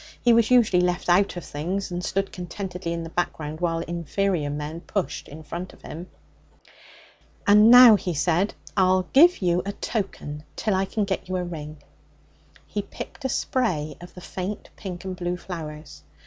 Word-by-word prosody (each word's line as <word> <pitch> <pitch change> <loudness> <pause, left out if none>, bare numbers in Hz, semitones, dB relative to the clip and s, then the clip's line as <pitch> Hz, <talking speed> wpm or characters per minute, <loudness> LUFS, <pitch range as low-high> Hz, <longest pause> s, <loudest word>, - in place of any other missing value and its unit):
He 240 - +4
was 230 -1 +4
usually 230 -8 +5
left 180 0 0
out 180 +1 +3
of 175 - -6
things, 180 +7 -3
and 175 0 -3
stood 195 +1 -1
contentedly 180 -1 -5
in 170 0 -3
the 165 - -8
background 155 -3 -3
while 165 -1 0
inferior 170 -1 -1
men 150 +3 -5
pushed 165 -7 -3
in 155 +2 -10
front 175 +4 -6
of - - -20
him. 170 +4 -8 1.4
'And 210 +2 +7
now,' 245 -3 +10
he 180 -4 -3
said, 175 +6 +1 0.2
'I'll 185 -1 +4
give 330 - +6
you 175 0 +2
a 200 - -4
token 170 -10 -4
till 215 - 0
I 190 +1 +1
can 205 +2 -1
get 190 -1 -3
you 185 - -1
a 180 - -1
ring.' 155 -4 -7 0.8
He - - -3
picked 285 - -9
a - - +1
spray 155 - -1
of 175 - -12
the 180 - -10
faint 190 +4 -6
pink 185 -3 -7
and 185 -1 -4
blue 175 0 -3
flowers. 155 -4 -8
180 Hz, 175 wpm, -25 LUFS, 165-195 Hz, 1.4 s, now